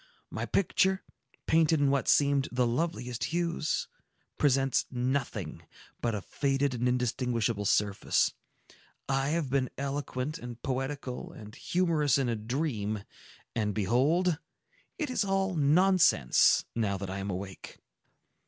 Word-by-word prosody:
My - - -3
picture, 190 0 +2 0.4
painted 160 -1 +3
in 140 -1 +3
what 140 -2 0
seemed 140 -2 +3
the 125 0 +2
loveliest 125 -2 -2
hues, 170 -2 -1 0.5
presents 135 -2 +2
nothing 125 - -2 0.4
but 115 -2 0
a 100 - -4
faded 140 -1 0
and 125 0 0
indistinguishable 120 -3 0
surface. 100 0 +2 0.7
I 135 +1 +1
have 155 -4 -1
been 135 -2 +1
eloquent 140 +1 -3
and 120 -1 -8
poetical 135 -1 -3
and 105 -1 -11
humorous 165 -6 +1
in 135 -3 0
a 115 - 0
dream,—and 110 -3 -4
behold! 145 - +2 0.6
it 305 -6 -2
is 235 - +1
all 195 -1 0
nonsense, 160 - +4
now 105 -4 0
that 95 0 -5
I 95 - -4
am 100 +1 -4
awake." 95 0 -6
135 Hz, 125 wpm, -29 LUFS, 115-155 Hz, 0.7 s, nonsense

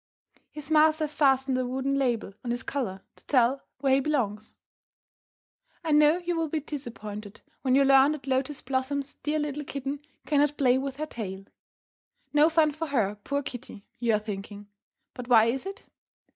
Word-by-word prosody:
His 300 0 -8
master 310 0 +4
has 300 -1 -3
fastened 265 -3 +3
a - - +1
wooden 265 +2 -1
label 245 -7 0
on 245 - -4
his 240 +1 -2
collar 195 -9 -3
to - - -19
tell 255 0 +3 0.2
where 270 -2 +3
he 270 - +5
belongs. 225 -8 -2 1.3
I 320 - -1
know 300 +2 +5
you 350 -1 -2
will 325 -1 0
be 315 - -1
disappointed 215 -8 -7 0.2
when 260 -1 +2
you 275 0 +5
learn 270 +2 +6
that 295 -4 -8
Lotus 265 +1 0
Blossom's 270 +2 -2
dear 300 +1 0
little 295 -1 -2
kitten 280 0 -4 0.3
cannot 295 0 +2
play 255 -2 +3
with 270 0 -4
her 305 - -2
tail. 195 -8 -6 0.9
No 300 +2 +6
fun 320 -2 +3
for 315 +3 -4
her, 225 -8 +1
poor 285 0 -1
kitty, 245 -6 -8
you 235 -2 +2
are - - +1
thinking. 205 -1 -7 0.4
But 250 -2 -8
why 225 -3 +6
is 255 +9 -1
it? 395 +1 -8
270 Hz, 175 wpm, -27 LUFS, 240-295 Hz, 1.3 s, learn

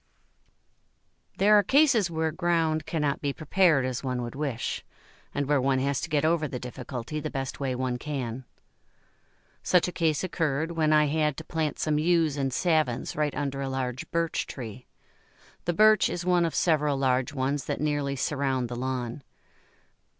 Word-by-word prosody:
There 210 +2 +5
are - - +5
cases 245 - +4
where 160 -1 -1
ground 165 -2 0
cannot 150 -3 -1
be 140 -1 -1
prepared 155 -3 +3
as 130 0 -3
one 125 -2 -2
would 120 - -6
wish, 140 -5 -3 0.5
and 140 0 -1
where 145 -1 +2
one 135 0 +2
has 140 +1 0
to - - -4
get 150 0 +1
over 160 -1 +2
the 130 - -5
difficulty 125 +2 -6
the - - -4
best 135 -1 -4
way 135 -2 -1
one 125 -1 -2
can. 130 -4 -4 1.2
Such 180 -1 +3
a - - -3
case 160 -3 0
occurred 165 -3 -1
when 160 -2 +1
I 150 0 +5
had 150 -1 0
to 160 - -6
plant 160 -2 -2
some 150 -1 0
Yews 165 -2 +2
and 135 -2 -1
Savins 155 -6 0
right 150 -1 0
under 140 -1 -2
a 135 - -2
large 130 -1 -3
Birch 170 -1 -1
tree. 125 -1 -8 0.8
The 175 - +1
Birch 215 +2 +5
is 175 0 -4
one 180 -1 +3
of 165 - -2
several 150 -4 +2
large 130 -1 +1
ones 135 0 -1
that - - -3
nearly 145 -2 -1
surround 135 -3 -1
the 120 - -4
lawn. 125 0 -3
145 Hz, 170 wpm, -27 LUFS, 130-160 Hz, 1.2 s, There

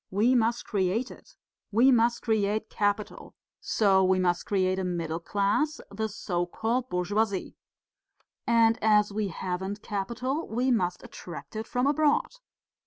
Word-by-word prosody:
We 215 +6 +2
must 235 -1 +1
create 205 +4 -1
it. - - -15 0.4
We 240 +6 +5
must 235 -1 +2
create 215 -1 0
capital, 205 0 -2 0.2
so 195 -3 +3
we 185 0 +3
must 175 -1 0
create 185 -1 +1
a - - -2
middle 170 -3 -2
class, 205 - 0
the 220 +2 -3
so 175 -3 -2
called 235 +7 -2
bourgeoisie. 200 +2 -1 0.9
And 230 -1 +4
as 210 -1 +4
we 210 -1 -1
haven't 190 +3 -4
capital 245 +9 -3
we 250 +4 0
must 180 -6 0
attract 175 +4 -10
it 220 +1 -4
from 250 +1 0
abroad. 290 +1 +2
210 Hz, 140 wpm, -27 LUFS, 190-235 Hz, 0.9 s, We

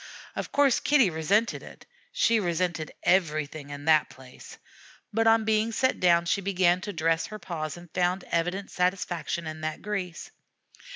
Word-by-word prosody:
Of - - -5
course 280 -3 +3
Kitty 265 -10 +3
resented 195 +8 +1
it - - -13 0.3
she 470 - +2
resented 175 -4 -1
everything 155 -5 0
in 145 0 -8
the 155 -1 +5
place; 130 -1 -13 0.6
but 225 +1 +2
on 225 -1 +4
being 220 +1 +1
set 260 +3 +1
down 170 -1 +4
she 170 +3 0
began 185 -2 +2
to 205 - -5
dress 165 -2 0
her 215 - -7
paws 170 -5 -5
and 175 0 -12
found 180 +1 0
evident 180 +4 -1
satisfaction 180 -3 -1
in 155 0 -6
that 155 0 -4
grease. 190 -5 -4
180 Hz, 160 wpm, -27 LUFS, 160-205 Hz, 0.6 s, the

